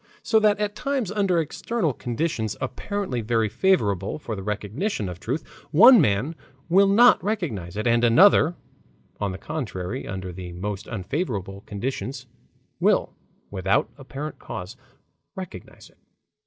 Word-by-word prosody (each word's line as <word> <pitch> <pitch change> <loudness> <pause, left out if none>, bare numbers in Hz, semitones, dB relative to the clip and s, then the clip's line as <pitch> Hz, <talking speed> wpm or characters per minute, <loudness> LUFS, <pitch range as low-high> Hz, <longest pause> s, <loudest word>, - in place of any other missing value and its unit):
So 220 - +4
that 210 -1 +3
at 205 0 -1
times 265 -5 -2
under 200 -4 +1
external 165 - -1
conditions 120 -4 -2
apparently 200 - -3
very 115 0 +1
favorable 100 - +1
for 120 -7 -5
the 95 - -6
recognition 105 - -3
of 90 -1 -7
truth, 130 +10 -3 0.2
one 230 - +8
man 125 +5 +1 0.4
will 195 +3 +5
not 230 +3 +6
recognize 135 - -3
it, 110 - -2
and 120 0 +3
another, 165 - +6 0.6
on 100 -2 -1
the 95 - -6
contrary, 115 - -5
under 95 -2 -5
the 90 -1 -8
most 95 +3 -5
unfavorable 100 - -3
conditions 125 +4 -4 0.5
will, - - +2 0.4
without 95 +1 +1
apparent 140 +2 -7
cause, 105 -1 -7 0.6
recognize 185 - -10
it. - - -32
120 Hz, 135 wpm, -24 LUFS, -, 0.6 s, one